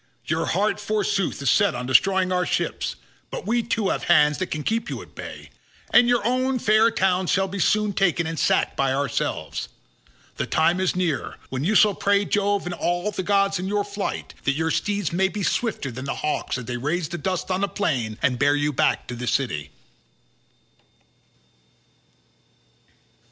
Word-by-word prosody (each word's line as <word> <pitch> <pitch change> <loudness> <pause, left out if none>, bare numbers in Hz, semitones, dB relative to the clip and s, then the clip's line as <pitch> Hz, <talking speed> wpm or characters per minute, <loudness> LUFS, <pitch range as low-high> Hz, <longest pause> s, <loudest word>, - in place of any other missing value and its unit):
Your 160 0 -1
heart, 200 +9 +1
forsooth, 205 -6 -1
is 135 - +3
set - - +3
on 125 0 -4
destroying 185 +8 +3
our 180 0 +2
ships, - - -2 0.3
but - - -6
we 235 +1 +1
too 225 -3 -1
have - - -2
hands 150 -3 +4
that 185 - -2
can 155 -1 -3
keep 225 +5 -1
you - - -4
at - - -18
bay, - - -9 0.4
and 240 0 +6
your 240 -4 +2
own 255 +2 +1
fair 220 0 +4
town 190 -4 +1
shall 190 +2 +2
be 195 +1 -5
sooner 210 +2 +2
taken 175 -3 +1
and 160 -1 -4
sacked - - +2
by 135 -1 +1
ourselves. 140 -3 -2 0.7
The - - -2
time 170 +3 +2
is 190 -1 0
near 175 -6 -1
when 130 +1 -3
you 205 +7 +1
shall 210 0 +6
pray 200 +1 +2
Jove 205 -1 0
and 175 - -3
all 175 +4 -1
the 190 - -3
gods 195 0 +2
in 185 - -3
your 205 +1 0
flight, 200 0 -4
that 140 - +2
your 160 +3 -1
steeds 205 -3 -1
may 190 +2 +3
be 205 +1 -4
swifter 205 - -1
than 130 +3 -7
hawks 140 0 -2
as 125 - -7
they 120 0 -3
raise 150 +5 -2
the 175 0 -5
dust 185 -1 -2
on 185 +1 0
the 200 - +2
plain 125 - -2
and 125 -2 +2
bear 145 +2 +4
you 145 0 0
back - - +1
to - - -7
your 125 +1 -5
city." 115 - -1
185 Hz, 185 wpm, -24 LUFS, 150-205 Hz, 0.7 s, and